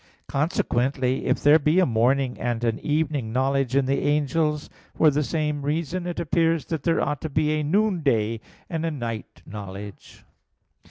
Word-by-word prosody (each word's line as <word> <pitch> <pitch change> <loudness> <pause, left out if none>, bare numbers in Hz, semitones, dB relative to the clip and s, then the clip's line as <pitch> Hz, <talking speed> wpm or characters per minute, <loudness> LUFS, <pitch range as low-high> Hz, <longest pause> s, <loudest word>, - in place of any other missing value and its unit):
Consequently, 135 -4 0
if - - 0
there 150 +2 +7
be 150 +3 +2
a 185 - +5
morning 125 +3 +1
and 120 -1 -2
an 115 -1 0
evening 145 -6 -1
knowledge 135 +1 0
in 140 -1 +3
the 135 +1 +1
angels, 150 +1 0 0.3
for 155 -2 +5
the 145 +2 +1
same 150 -1 -1
reason 165 +5 -2
it 175 - -4
appears 165 -1 +1
that 160 -3 -3
there 165 +3 +1
ought 150 - -2
to 160 - -4
be 150 +1 +1
a 155 0 0
noonday 145 - +1 0.3
and 165 -1 -3
a 165 - 0
night 120 -7 -6
knowledge. 100 0 -9
145 Hz, 165 wpm, -24 LUFS, 125-160 Hz, 0.3 s, there